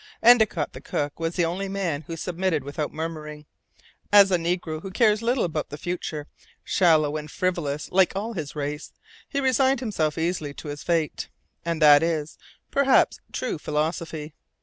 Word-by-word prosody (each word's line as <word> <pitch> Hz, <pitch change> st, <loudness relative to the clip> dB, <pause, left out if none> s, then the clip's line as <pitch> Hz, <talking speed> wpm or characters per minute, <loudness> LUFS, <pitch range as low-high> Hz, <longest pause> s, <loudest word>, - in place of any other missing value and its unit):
Endicott, 220 Hz, -9 st, +5 dB
the 130 Hz, -, -9 dB
cook, 145 Hz, +1 st, -3 dB
was 165 Hz, +1 st, -2 dB
the 175 Hz, -, +2 dB
only 190 Hz, +4 st, -3 dB
man 185 Hz, -7 st, -2 dB
who 165 Hz, -, -5 dB
submitted 175 Hz, -3 st, -1 dB
without 145 Hz, +2 st, -4 dB
murmuring. 155 Hz, -1 st, -6 dB, 0.7 s
As 200 Hz, -1 st, +7 dB
a -, -, +5 dB
negro, 170 Hz, -2 st, -2 dB
who 195 Hz, -, -6 dB
cares 215 Hz, +1 st, +3 dB
little 240 Hz, +2 st, +1 dB
about 160 Hz, -3 st, -2 dB
the 145 Hz, -, -7 dB
future, 160 Hz, -3 st, -4 dB, 0.4 s
shallow 155 Hz, -4 st, +3 dB
and 150 Hz, 0 st, -7 dB
frivolous 160 Hz, -5 st, -2 dB
like 190 Hz, 0 st, +3 dB
all 220 Hz, +4 st, -3 dB
his 155 Hz, -7 st, -5 dB
race, 150 Hz, +1 st, -4 dB, 0.4 s
he 280 Hz, -, -1 dB
resigned 265 Hz, 0 st, +3 dB
himself 170 Hz, -, -1 dB
easily 160 Hz, -3 st, -2 dB
to 150 Hz, -, -8 dB
his 145 Hz, 0 st, -6 dB
fate; 165 Hz, -3 st, -1 dB, 0.3 s
and 165 Hz, -2 st, -1 dB
this 145 Hz, -1 st, +9 dB
is, 160 Hz, -2 st, -2 dB, 0.3 s
perhaps, 275 Hz, -1 st, +3 dB
true 245 Hz, -10 st, -3 dB
philosophy. 155 Hz, 0 st, -3 dB
165 Hz, 165 wpm, -25 LUFS, 150-190 Hz, 0.7 s, this